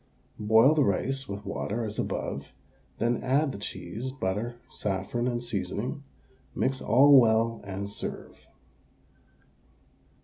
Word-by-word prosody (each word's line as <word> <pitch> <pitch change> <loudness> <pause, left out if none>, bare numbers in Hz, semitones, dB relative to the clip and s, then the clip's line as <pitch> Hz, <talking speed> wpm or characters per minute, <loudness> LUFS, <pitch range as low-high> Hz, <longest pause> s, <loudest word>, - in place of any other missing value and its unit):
Boil 110 +6 +5
the 155 -2 +3
rice 135 +6 -1
with 100 +1 -6
water 115 +3 -3
as 105 -1 -5
above, 70 +1 -3 0.5
then 120 0 0
add 140 +3 +2
the 100 - -7
cheese, 100 +6 -5
butter, 115 -1 -2
saffron, 105 +5 -2
and 120 -1 -2
seasoning; 120 - -3 0.5
mix 130 0 0
all 140 +3 +7
well, 115 0 +2
and 100 0 -5
serve. 100 - -7
115 Hz, 115 wpm, -28 LUFS, 100-130 Hz, 0.5 s, all